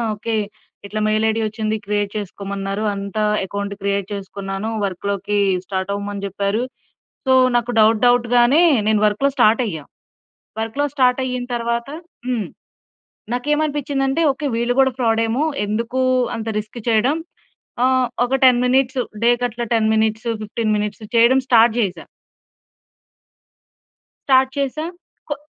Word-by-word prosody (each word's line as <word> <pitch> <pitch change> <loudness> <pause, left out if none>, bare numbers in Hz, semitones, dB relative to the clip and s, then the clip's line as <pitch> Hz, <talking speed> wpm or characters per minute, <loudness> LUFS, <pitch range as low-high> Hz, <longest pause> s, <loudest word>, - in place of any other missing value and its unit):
Okay. 225 +2 -3 0.5
ఇట్లా 210 +2 -4
mail 215 +1 +1
ID 220 +1 0
వచ్చింది 215 0 -2
create 205 0 -1
చేసుకోమన్నారు. 200 0 -4
అంతా 200 +2 -3 0.2
ఎకౌంట్ 200 +1 -4
క్రియేట్ 200 -1 -1
చేసుకున్నాను. 195 +1 -5 0.2
వర్క్‌లోకీ 200 +2 -2 0.3
స్టార్టవ్వమని 200 +1 -3
చెప్పారు. 200 +3 -1 0.7
సో, 260 - +4 0.2
నాకు 240 0 0
డౌట్ 220 +1 +4
డౌట్‌గానే, 245 +4 +4 0.3
నేను 215 -1 +3
వర్కులో 210 +7 +1
స్టార్టయ్యా. 215 - +2 0.8
వర్క్‌లో 225 +6 -2
స్టార్టయ్యిన 255 -1 +1
తర్వాత 235 +1 -2 0.4
హ్మ్. 235 -5 -1 0.9
నాకేమనిపించ్చిందంటే 285 +1 0
ఓకే. 280 +3 -6
వీళ్ళు 235 +1 0
గూడా 265 0 +5
ఫ్రాడేమో, 225 +2 +1 0.2
ఎందుకూ 230 +5 -2 0.4
అంత 225 -1 -5
రిస్క్ 215 +3 -8
చెయడం. 235 +7 +2 0.7
ఆ! - - +5 0.4
ఒక 250 +2 -1
10 250 -2 +6
మినిట్స్, 260 +1 +2 0.2
డే 235 - +5
కట్లా 240 -1 -2
10 220 -1 +2
మినిట్స్, 220 +1 0 0.2
15 215 0 -1
మినిట్స్ 210 +1 -3
చెయడం 235 +3 +5
స్టార్ట్ 230 -2 +5
జేశా. 200 -6 -1 2.2
స్టార్ట్ 265 -1 +4
చేశా. 280 +3 -2 0.4
కొ - - +1
225 Hz, 120 wpm, -20 LUFS, 205-250 Hz, 2.2 s, 10